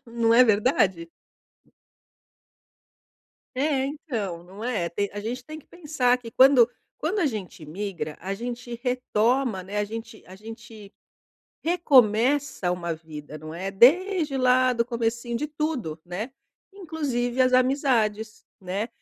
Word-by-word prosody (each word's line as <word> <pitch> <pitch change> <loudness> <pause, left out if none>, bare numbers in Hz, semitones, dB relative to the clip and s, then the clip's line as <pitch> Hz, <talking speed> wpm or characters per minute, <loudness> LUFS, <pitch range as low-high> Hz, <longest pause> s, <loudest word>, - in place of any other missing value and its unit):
Não 230 -1 +1
é 250 - +8
verdade? 205 -6 +2 2.5
É 270 -1 +1
então, 225 - -5
não 195 +5 -10
é? 210 -9 -1
Tem 200 +4 -2
a 205 - -5
gente 245 +4 -5
tem 310 0 -9
que - - -28
pensar 290 -7 0
que 235 -2 -10
quando 260 -3 +6 0.3
quando 375 +7 -1
a 320 - +2
gente 200 - -5
imigra, 170 -1 -5
a 195 +2 -4
gente 240 +1 -6
retoma, 250 -3 0
né? 200 +3 -5
A 205 - +1
gente 225 +1 -8
a 185 - -12
gente 220 0 -12 0.7
recomeça 270 - +3
uma 170 -1 -3
vida, 155 -2 -9
não 155 +1 -9
é? 190 +3 -4
Desde 310 - +4
lá 255 0 +3
do 235 -1 0
comecinho 235 0 -2
de 300 - -2
tudo, 290 - -3
né? 205 +9 -5 0.4
Inclusive 270 -9 -2
as 255 0 +4
amizades, 250 -5 +1 0.2
né? 195 +5 -3
235 Hz, 135 wpm, -25 LUFS, 200-265 Hz, 2.5 s, é